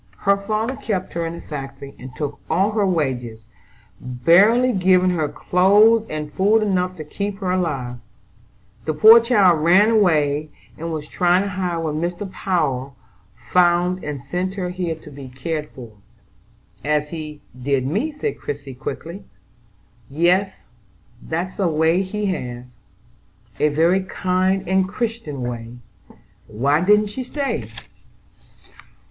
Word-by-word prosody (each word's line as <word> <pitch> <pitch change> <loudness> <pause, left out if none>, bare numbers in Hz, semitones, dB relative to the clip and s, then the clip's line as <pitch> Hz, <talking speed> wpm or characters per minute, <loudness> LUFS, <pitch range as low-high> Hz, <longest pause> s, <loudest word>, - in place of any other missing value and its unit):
Her 200 0 +4
father 215 +5 -2
kept 210 -9 -3
her 170 -1 -2
in 165 - -5
a - - -9
factory, 135 -1 -8
and 130 - -8
took 145 0 -4
all 190 +6 +2
her 210 -2 +1
wages, 125 -10 -2 0.5
barely 195 - +4
giving 185 -1 +3
her 155 -4 -1
clothes 205 +8 +4
and 150 -1 -5
food 210 +6 +3
enough 185 -2 0
to 155 - -6
keep 200 +6 -4
her 190 -3 -2
alive. 140 -10 -2 0.9
The 155 - -1
poor 220 +9 +9
child 205 -8 +4
ran 190 +7 +5
away, 155 -8 +2 0.3
and 165 +1 -5
was 155 -2 -5
trying 180 +3 +2
to 200 - -3
hide 180 -2 -2
when 155 -1 -2
Mr. 180 +3 -4
Power 140 -10 -1 0.6
found 180 0 +3
and 145 -3 -5
sent 180 +6 -3
her 185 -3 -3
here 180 -3 -3
to 155 -1 -14
be 135 -2 -10
cared 150 +4 -4
for." 120 -4 -11 0.9
"As 150 0 0
he 155 -2 -7
did 130 +1 -1
me?" 210 - -1
said 305 +9 -4
Christie 145 -2 -6
quickly. 165 +8 -7 0.8
"Yes, 180 +6 +1 0.6
that's 175 +5 -4
a 190 - +2
way 160 +3 +2
he 210 +2 -3
has." 125 -10 -4 0.9
"A 150 - +3
very 165 +6 +2
kind 185 0 0
and 190 0 +2
Christian 215 - -4
way. 120 -1 -5 0.7
Why 140 +8 +1
didn't 210 +1 +3
she 255 +4 -4
stay?" 280 +2 -3
175 Hz, 140 wpm, -21 LUFS, 150-195 Hz, 0.9 s, poor